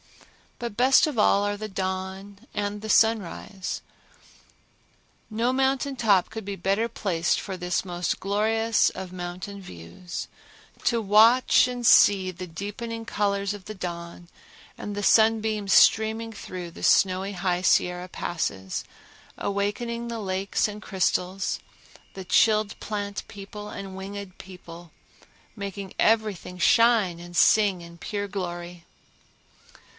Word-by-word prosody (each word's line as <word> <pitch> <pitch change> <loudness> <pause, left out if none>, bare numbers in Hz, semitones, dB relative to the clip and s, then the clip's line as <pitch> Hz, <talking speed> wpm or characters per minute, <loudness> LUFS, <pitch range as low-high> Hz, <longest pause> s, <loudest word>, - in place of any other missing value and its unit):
But 235 -3 -5
best 260 +2 +5
of 295 -6 -4
all 200 -1 +4
are 205 0 -1
the 215 +1 -5
dawn 190 +1 -4 0.2
and 205 0 -2
the 220 - -6
sunrise. 205 -3 +1 1.5
No 235 +3 0
mountain 270 +1 +1
top 205 -7 +3
could 220 -2 -6
be 200 0 -4
better 195 +5 0
placed 175 -7 0
for 195 - -5
this 180 +1 -1
most 175 -1 -2
glorious 220 +3 +2
of 185 -1 -8
mountain 185 +3 -6
views—to 175 - -6
watch 225 +6 +5
and 245 -1 -4
see 195 -4 +6
the 185 +1 -7
deepening 215 +6 -6
colors 200 -2 -1
of 195 -3 -12
the 215 - -7
dawn 170 -1 -7 0.5
and 205 - -6
the 205 - -3
sunbeams 220 -2 +3
streaming 220 +1 +4
through 185 -4 -7
the - - -11
snowy 190 +1 +3
High 180 -1 -1
Sierra 180 0 +2
passes, 100 - -3 0.5
awakening 230 +4 -2
the 230 -1 -4
lakes 195 0 -1
and 210 0 -7
crystals, 190 -1 -1 0.6
the 190 -1 -7
chilled 215 +1 +3
plant 205 -1 -4
people 205 +1 -9
and 195 -2 -7
winged 195 0 -7
people, 175 -2 -12 0.3
and - - -25 0.3
making 200 -1 -6
everything 215 -5 +1
shine 225 -4 +4
and 175 0 -8
sing 200 -1 +4
in 170 0 -12
pure 205 +2 -4
glory. 175 -3 -6
200 Hz, 130 wpm, -25 LUFS, 185-220 Hz, 1.5 s, see